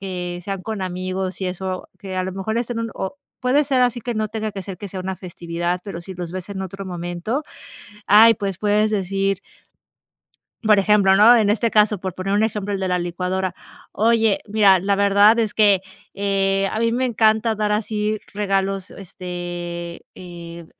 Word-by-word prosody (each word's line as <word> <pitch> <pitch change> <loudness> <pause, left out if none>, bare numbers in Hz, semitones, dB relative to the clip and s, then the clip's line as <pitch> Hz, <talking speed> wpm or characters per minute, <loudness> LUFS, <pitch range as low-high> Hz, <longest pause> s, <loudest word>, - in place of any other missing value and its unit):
que 180 -2 -5
sean 195 -1 -4
con 220 -2 -4
amigos 185 0 -3
y 190 - -1
eso, 185 0 -5
que 190 -2 -6
a 185 - 0
lo 185 - -4
mejor 195 +4 -2
es 240 0 -2
en 230 -1 -2
un 230 0 -3
o 190 +9 -4 0.2
puede 265 +4 +3
ser 265 -2 +2
así 245 -1 +1
que 240 +1 -4
no 215 0 0
tenga 220 0 -3
que 195 - -5
ser 190 0 -7
que 205 - -7
sea 190 - -7
una 190 +1 -4
festividad, 175 -1 -3
pero, 185 -4 -6
si 190 +2 -9
los 175 -1 -6
ves 185 0 -6
en 190 -1 -4
otro 195 +1 -7
momento, 175 - -3 0.7
ay, 220 +3 +8
pues 195 -3 -3
puedes 210 +1 +2
decir 195 -1 0 1.3
por 215 -1 +5
ejemplo, 195 -1 +4
¿no?, 220 +4 +8
en 215 -3 +3
este 225 +2 +1
caso, 210 -1 +4
por 185 -1 -5
poner 190 +2 -2
un 210 +2 +3
ejemplo, 210 -2 -2
el 200 - -1
de 190 - -2
la 180 -1 0
licuadora: 180 +2 -2 0.4
"Oye, 225 -1 +2
mira, 205 -3 +5
la 195 +3 +1
verdad 200 +2 +5
es 220 -2 -1
que, 205 -3 +5 0.3
eh, 195 -1 +1
a - - -3
mí 230 0 +1
me 250 +2 0
encanta 220 -2 +2
dar 210 -1 0
así 210 0 -1
regalos, 195 -1 -1
este, 175 -2 -6
eh, 170 -2 -10
195 Hz, 195 wpm, -21 LUFS, 185-215 Hz, 1.3 s, ay